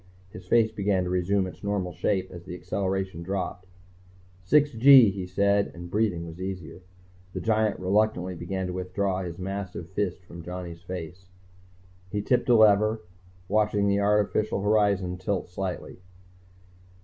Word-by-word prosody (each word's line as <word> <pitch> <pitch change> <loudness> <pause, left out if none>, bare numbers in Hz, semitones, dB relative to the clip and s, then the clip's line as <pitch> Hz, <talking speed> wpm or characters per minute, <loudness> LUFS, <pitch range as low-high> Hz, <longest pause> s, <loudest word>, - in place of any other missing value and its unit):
His 90 -4 -11
face 115 +1 +3
began 100 -3 0
to 90 - -3
resume 95 +2 +1
its 95 - -10
normal 100 -3 -2
shape 95 -2 -1
as 85 -1 -9
the 90 - -7
acceleration 95 -2 -3
dropped. 90 0 -4 0.4
"... 90 0 -28
six 145 +9 +3
gee," 125 -2 +7
he 95 -2 -5
said, 100 +2 +2
and 85 0 -9
breathing 100 -6 0
was 85 +2 -9
easier. 95 -2 -6 0.5
The - - -3
giant 110 -2 +1
reluctantly 95 -1 +1
began 95 +2 -4
to 90 - -4
withdraw 95 +1 -2
his 85 -2 -6
massive 95 -2 -5
fist 95 -2 -2
from 85 -1 -10
Johnny's 90 -1 -7
face. 90 0 -8 0.8
He 105 +2 -2
tipped 125 +3 +1
a 120 - +6
lever, 110 0 +4 0.5
watched 105 0 +1
the 100 0 +2
artificial 105 0 +1
horizon 100 -4 +1
tilt 95 0 -2
slightly. 90 0 -5
95 Hz, 150 wpm, -26 LUFS, 90-105 Hz, 0.8 s, gee